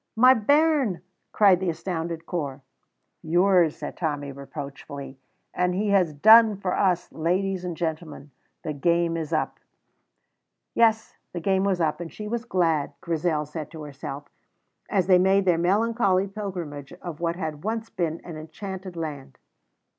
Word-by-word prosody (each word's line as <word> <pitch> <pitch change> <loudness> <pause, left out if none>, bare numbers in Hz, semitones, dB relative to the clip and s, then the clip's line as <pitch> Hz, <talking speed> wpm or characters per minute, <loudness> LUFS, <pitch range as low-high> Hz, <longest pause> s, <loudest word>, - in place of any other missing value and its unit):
"My 255 +3 +7
bairn!" 285 - +2 0.3
cried 195 -4 +5
the 185 -1 -1
astounded 165 0 -4
Corp. 145 -6 -4 0.6
"Yours," 175 0 +3
said - - -7
Tommy, 145 -4 -2
reproachfully; 140 0 -8 0.3
"and 180 0 0
he 205 +2 0
has 190 -5 +3
done 220 +7 +7
for 190 -2 -2
us. 180 -3 +1
Ladies 185 +3 -1
and 175 -3 -4
gentlemen, 155 -3 -4 0.3
the 155 - -3
game 170 +3 +1
is 160 -2 -4
up." 155 -1 -1 1.1
Yes, 225 -1 +2 0.2
the 175 - -3
game 190 +2 +1
was 190 -3 +1
up, 160 0 0
and 165 - -6
she 210 - -7
was 235 +2 -3
glad, 165 - +1
Grizel 160 -2 -1
said 150 0 -7
to 160 -2 -9
herself, 140 0 -7 0.6
as 190 -4 +2
they 185 -1 +5
made 190 +1 +3
their 175 -3 +3
melancholy 195 +1 +2
pilgrimage 180 -9 -6
of 175 -3 -8
what 170 0 -1
had 155 -4 -5
once 225 +1 -3
been 165 -2 -2
an 170 -3 -8
enchanted 185 +3 -7
land. 145 -5 -6
175 Hz, 150 wpm, -25 LUFS, 155-195 Hz, 1.1 s, My